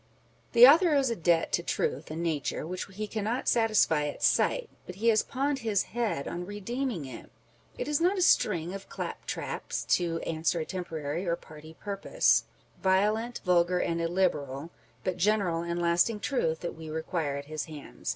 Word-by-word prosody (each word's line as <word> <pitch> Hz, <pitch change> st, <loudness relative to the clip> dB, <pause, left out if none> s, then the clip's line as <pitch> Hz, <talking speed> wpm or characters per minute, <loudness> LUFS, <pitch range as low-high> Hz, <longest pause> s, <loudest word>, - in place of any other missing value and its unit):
The 240 Hz, 0 st, +10 dB
author 325 Hz, +2 st, +6 dB
owes 270 Hz, -3 st, +2 dB
a -, -, 0 dB
debt 170 Hz, -3 st, +2 dB
to -, -, +1 dB
truth 150 Hz, -3 st, -2 dB
and 160 Hz, +2 st, -4 dB
nature 155 Hz, -3 st, -2 dB
which 180 Hz, +3 st, -4 dB
he 210 Hz, +3 st, -4 dB
cannot 220 Hz, +4 st, -3 dB
satisfy 215 Hz, -10 st, +3 dB
at 145 Hz, -, -6 dB
sight, -, -, +2 dB, 0.2 s
but 180 Hz, -, -7 dB
he 225 Hz, +4 st, +2 dB
has 215 Hz, -2 st, +4 dB
pawned 275 Hz, +1 st, -1 dB
his 215 Hz, -5 st, +1 dB
head 225 Hz, -12 st, -1 dB
on 175 Hz, -, -4 dB
redeeming 205 Hz, -, -3 dB
it. 130 Hz, -3 st, -10 dB, 0.5 s
It -, -, -3 dB
is 300 Hz, +1 st, +1 dB
not 370 Hz, +4 st, +3 dB
a 365 Hz, -, +2 dB
string 175 Hz, -, +3 dB
of 195 Hz, 0 st, -8 dB
clap -, -, -6 dB
traps -, -, -4 dB
to 170 Hz, -2 st, -2 dB
answer 165 Hz, +1 st, -1 dB
a 160 Hz, -, -2 dB
temporary 165 Hz, -2 st, -4 dB
or 170 Hz, -, +2 dB
party 155 Hz, -1 st, -13 dB
purpose, 205 Hz, -, +2 dB, 0.3 s
â€" -, -, -26 dB
violent, 210 Hz, +5 st, +1 dB
vulgar, 180 Hz, 0 st, +3 dB
and 170 Hz, -1 st, -1 dB
illiberal, 165 Hz, -6 st, 0 dB
â€" 160 Hz, +4 st, -9 dB, 0.3 s
but 185 Hz, -2 st, -2 dB
general 185 Hz, -3 st, +1 dB
and 170 Hz, 0 st, -3 dB
lasting 175 Hz, +6 st, +2 dB
truth 165 Hz, -, -1 dB
that 175 Hz, -, -4 dB
we 160 Hz, 0 st, -9 dB
require 160 Hz, -2 st, -2 dB
at 140 Hz, -, -6 dB
his 155 Hz, +1 st, -4 dB
hands. 150 Hz, -3 st, -8 dB
180 Hz, 185 wpm, -29 LUFS, 160-220 Hz, 0.5 s, The